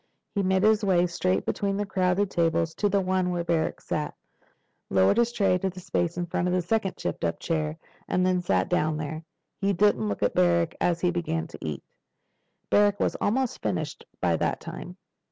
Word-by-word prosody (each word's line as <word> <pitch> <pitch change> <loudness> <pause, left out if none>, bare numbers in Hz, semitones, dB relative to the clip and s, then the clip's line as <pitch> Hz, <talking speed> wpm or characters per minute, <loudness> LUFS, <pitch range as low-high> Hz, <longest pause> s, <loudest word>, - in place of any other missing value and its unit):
He 200 - +1
made 190 0 +2
his 215 0 +4
way 180 -3 +3
straight 100 - 0
between 200 -1 -1
the 205 - -1
crowded 190 0 +1
tables 165 -1 +1
to 205 - 0
the 200 0 +2
one 185 -1 +1
where 175 -1 -1
Barrack 165 -2 0
sat, 150 -1 -3 0.7
lowered 95 - +4
his 235 0 +3
tray 195 -5 +2
to 190 - 0
the 185 0 -9
space 175 -1 -1
in 175 - -1
front 175 +1 -1
of 180 - +1
the 180 - +2
second 200 +1 0
tipped 85 - -4
up 85 - -1
chair, 155 -2 -2 0.3
and 180 0 +1
then 185 -1 +2
sat 95 - +1
down 155 0 +1
there. 155 +1 -5 0.4
He 200 0 +1
didn't 170 - +2
look 100 - -2
at 100 - +2
Barrack 170 -2 +3
as 170 -1 +1
he 180 - +2
began 165 -2 -2
to 165 - -11
eat. 75 -3 -4 0.9
Barrack 205 0 +4
was - - +1
almost 255 +3 0
finished 155 -5 -3 0.2
by 85 -2 +2
that - - -1
time. - - -8
175 Hz, 200 wpm, -26 LUFS, 160-195 Hz, 0.9 s, his